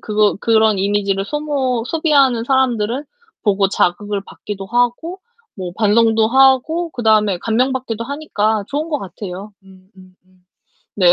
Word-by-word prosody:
그거 210 -1 +1
그런 220 -3 +3
이미지를 195 0 0
소모 275 -4 -2
소비하는 275 -8 +2
사람들을 255 0 0 0.4
보고 200 -2 +2
자극을 200 +2 -1
받기도 200 -2 -8
하고 245 - -1 0.4
뭐 180 -2 -6
반성도 225 +1 +3
하고 270 +6 +3
그다음에 215 -6 +2
감명받기도 235 +1 -1
하니까 220 -8 -1
좋은 300 +3 -3
것 295 -3 -1
같아요. 195 +1 -8
음음음. 185 -1 -19 0.8
네. 180 -3 +5
220 Hz, 300 characters per minute, -18 LUFS, 200-265 Hz, 0.8 s, 네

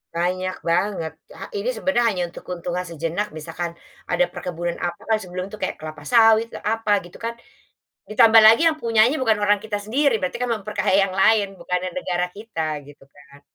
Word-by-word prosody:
Banyak 185 +2 -2
banget 170 -1 0 0.2
ha - - -7
ini 420 +4 -2
sebenarnya 280 - 0
hanya 185 -4 -2
untuk - - -11
keuntungan 180 0 -3
sejenak 170 +5 -3
misalkan, 165 +2 -5 0.4
ada - - +3
perkebunan 175 -1 -4
apa 175 -1 -3 0.2
sebelum 185 -1 -5
itu - - -6
kayak - - -2
kelapa 155 -1 -8
sawit 225 +5 +4 0.2
apa 225 0 0
gitu 175 - -13
kan, 230 0 -3 0.8
ditambah 225 0 +6
lagi 225 +7 +7
yang 310 - -6
punyanya 230 +3 +3
bukan 225 -4 +3
orang 205 0 +3
kita 210 0 -4
sendiri 270 +5 +2
berarti 185 +5 -2
kan 250 0 -2
memperkaya 210 -2 -1 0.2
yang - - -7
lain 220 -1 +4
bukannya 180 0 -2
negara 180 -7 -1
kita 165 -8 -4
gitu 145 -1 -16
kan. 140 0 -18
195 Hz, 175 wpm, -22 LUFS, 175-225 Hz, 0.8 s, lagi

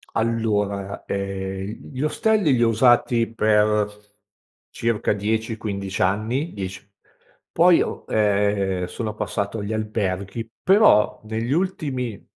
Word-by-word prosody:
Allora, 105 -3 -1
ehm, 95 0 -4
gli 130 - -4
ostelli 210 +2 +2
li 120 - +1
ho - - +4
usati 115 0 +3
per 105 -1 +1 0.6
circa 115 -3 0
10-15 105 -2 -3
anni, 110 - 0
10 95 0 -6 0.7
poi 170 +1 +5
ho, - - -3
ehm, 100 -3 +1
sono 110 +3 -4
passato 105 +1 -3
agli 100 +1 -4
alberghi, 105 0 -3
però 190 - +4
negli 110 +3 -3
ultimi 140 - -2
110 Hz, 105 wpm, -23 LUFS, 100-115 Hz, 0.7 s, poi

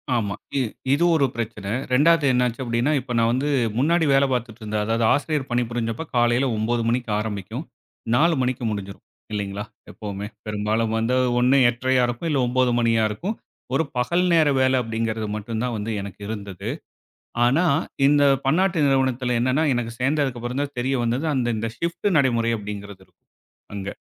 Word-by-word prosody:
ஆமா, 105 -4 -1 0.2
இ - - +3 0.3
இது 155 - +2
ஒரு 140 -3 +3
பிரச்சனை. 110 -4 -4 0.2
2வது 160 +3 +4
என்னாச்சு 125 0 +1
அப்டின்னா, 120 +4 0
இப்ப 125 -1 -9
நான் 115 0 +3
வந்து 140 +4 0 0.3
முன்னாடி 160 +5 +3
வேல 135 +1 +5
பார்த்துட்டு 120 -2 -3
இருந்தேன், 105 0 -2
அதாவது 115 +1 0
ஆசிரியர் 145 -1 -1
பணி 120 0 +2
புரிஞ்சப்ப, 115 +5 -3
காலையில் 120 +2 +3
9 115 +2 0
மணிக்கு 120 -1 -1
ஆரம்பிக்கும். 105 -3 -4 0.5
4 165 +6 +4
மணிக்கு 125 -1 -1
முடிஞ்சிரும். 100 -1 -6 0.3
இல்லைங்களா? 100 0 -3 0.3
எப்பவுமே. 105 -1 -6 0.2
பெரும்பாலும் 110 +2 -1
வந்து 115 +3 +1 0.2
ஒண்ணு 125 +3 +4
8.30-யா 130 +2 +1
இருக்கும் 120 +7 -3
இல்ல 145 - +1
9 125 0 +2
மணியா 115 -1 +2
இருக்கும். 185 - -4 0.4
ஒரு 160 - +2
பகல் 170 +9 +1
நேர 160 -3 +5
வேலை 130 0 +3
அப்டிங்கிறது 115 -1 -2
மட்டும்தான் 115 +3 -3
வந்து 105 +2 -3
எனக்கு 100 0 -9
இருந்தது. 100 -1 -6 0.8
ஆனா 140 +9 +3 0.4
இந்த 145 0 +4 0.2
பன்னாட்டு 170 +1 +2
நிறுவனத்துல 130 -2 +1
என்னன்னா, 130 +6 +2
எனக்கு 115 -1 -2
சேர்ந்ததுக்கு 135 -2 0
அப்புறம் 125 +4 -3
தான் 145 -1 -5
தெரிய 135 +2 0
வந்தது 120 +6 -1
அந்த 125 -2 0
இந்த 115 +1 -2
ஷிப்ட் 170 +4 -1
நடைமுறை 115 -4 +2
அப்படி 105 0 -5
என்கிறது 100 -1 -11
இருக்கும் - - -40 0.5
அங்க. 100 -1 -5
120 Hz, 160 wpm, -23 LUFS, 110-135 Hz, 0.8 s, வேல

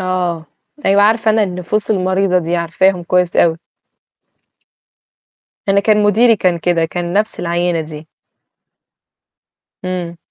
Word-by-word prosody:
آه، 180 -3 -2 0.4
أيوه، 200 +1 +3
عارفة 220 +1 +2
أنا 220 0 +2
النفوس 185 +3 -2
المريضة 185 -1 +1
دي، 175 0 -2
عارفاهم 175 +2 0
كويس 180 0 0
أوي. 165 -1 +3 2.1
أنا 200 0 +3
كان 210 0 +2
مديري 225 +3 +4
كان 180 -3 0
كده، 170 0 0
كان 175 +1 -4
نفس 210 +3 0
العينة 175 0 -1
دي. 155 0 -9 1.8
إمم. 180 -2 -4
180 Hz, 115 wpm, -16 LUFS, 170-200 Hz, 2.1 s, مديري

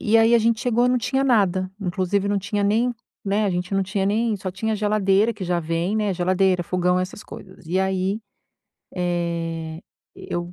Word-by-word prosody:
e 215 +2 +3
aí 225 +1 +5
a - - +6
gente 230 0 +1
chegou, 245 0 +2
não 250 0 +2
tinha 265 +3 0
nada, 190 -7 +2
inclusive 190 +1 0
não 205 0 +1
tinha 205 +1 -2
nem, 230 +5 +2 0.3
né, 205 +2 +1
a 200 - +1
gente 180 +2 -2
não 195 - +2
tinha 190 +1 -1
nem 220 +2 +1
só 190 -1 -5
tinha 215 +4 -2
geladeira, 210 +1 +2
que 200 -2 -6
já 175 -1 0
vem, 165 +5 -1
né, 210 -2 +1
geladeira, 185 0 +2
fogão, 180 +1 +1
essas 185 +3 -5
coisas. - - -12
E 180 +4 +1
aí, 190 +2 0 0.7
eh, 170 -2 -2 0.3
eu, 175 0 -5
195 Hz, 190 wpm, -23 LUFS, 180-215 Hz, 0.7 s, a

